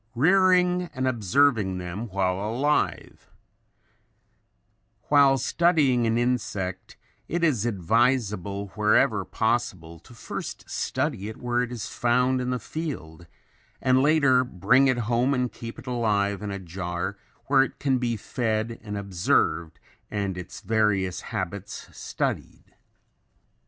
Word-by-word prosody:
] - - -37
Rearing 180 +3 +3
and 130 0 -1
Observing 110 -3 +2
Them 90 +6 -5
While 95 -1 0
Alive 120 +9 -1 1.8
While 140 -2 +5
studying 140 -5 +2
an 115 +1 +1
insect 100 -7 -2 0.3
it 170 +1 -2
is 125 -9 +2
advisable 100 -1 0
wherever 105 0 +2
possible 100 -7 -2
to 120 - -17
first - - -7
study 100 +3 -2
it 110 - -9
where 120 0 0
it 125 -1 -3
is 120 -3 -5
found 125 +2 +1
in 125 - -2
the 125 - 0
field 100 - -6 0.5
and 130 0 +3
later 140 -3 +4
bring 125 +5 +3
it 130 -2 +2
home 120 +4 +2
and 125 -2 -1
keep 115 0 -8
it - - -11
alive 105 -5 0
in 105 - -4
a 100 - -3
jar 90 +1 -4 0.3
where 135 -1 +4
it 135 - -2
can 135 -3 +1
be 120 -2 -1
fed 115 0 -2
and 105 -2 -5
observed 90 - 0 0.3
and 100 -3 -2
its 90 0 -8
various 100 -5 +1
habits 95 +1 -5
studied. - - -4
115 Hz, 130 wpm, -25 LUFS, 100-130 Hz, 1.8 s, While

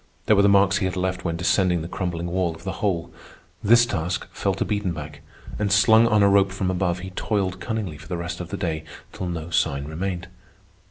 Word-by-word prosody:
There 110 - +5
were 100 - +5
the 100 - +5
marks 100 0 +4
he 95 - 0
had 95 - -2
left 90 0 -2
when 85 -2 -2
descending 90 0 +2
the - - -5
crumbling 85 -2 -3
wall 85 -1 -1
of 80 - -15
the 95 - -3
hole. 90 -5 -1 0.5
This 120 +3 +6
task 90 -5 -2
fell - - -1
to - - -1
Biedenbach, 85 -8 -3 0.4
and, 105 -1 0
slung 110 +4 +6
on 105 -2 +4
a - - +6
rope 100 -1 +4
from 95 -1 -1
above, 90 -1 -1
he 95 0 -7
toiled 95 -1 -1
cunningly 100 -9 -4
for 75 - -13
the 90 - -3
rest 85 +1 -5
of 90 -1 -6
the - - -4
day 80 -4 -2 0.3
till 95 - -4
no 85 -1 -5
sign 70 -4 +1
remained. 90 +3 -4
90 Hz, 220 wpm, -24 LUFS, 85-100 Hz, 0.5 s, This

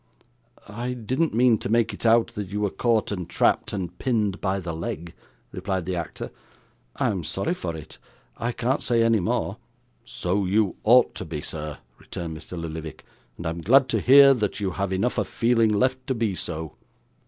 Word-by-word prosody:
'I 120 +4 -4
didn't 125 +5 -1
mean 120 -2 +4
to - - -4
make 115 -1 +2
it 105 - -2
out, 115 0 +4
that 105 -2 -5
you 105 +3 -3
were 100 -2 0
caught 115 +1 +1
and 90 -4 -4
trapped, - - +2
and 90 -4 -4
pinned 105 -7 0
by 95 0 0
the 85 -3 -5
leg,' 85 +1 -5 0.4
replied 95 -1 -3
the 90 +1 -2
actor. 85 -2 -5 0.6
'I'm 95 -4 0
sorry 95 - -2
for 85 - -4
it; 80 -2 -10 0.4
I 120 +1 -2
can't 125 +3 -1
say 115 -2 +2
any 115 -1 +3
more.' 90 - -1 0.5
'So 95 +3 -1
you 100 0 +1
ought 125 +3 +5
to - - -6
be, 75 - -5
sir,' 75 -1 -6 0.2
returned 85 -3 -6
Mr. 80 +2 -7
Lillyvick; 80 -1 -7 0.3
'and 85 - -8
I 80 - 0
am 85 +1 -6
glad 130 +8 +5
to - - +1
hear 140 +1 +8
that 105 -5 -2
you 100 -2 -1
have 100 +1 -2
enough 95 +6 0
of - - -1
feeling 115 -2 +2
left 130 +5 0
to 130 - 0
be 115 -4 0
so. 80 -5 -5
100 Hz, 190 wpm, -25 LUFS, 90-120 Hz, 0.6 s, hear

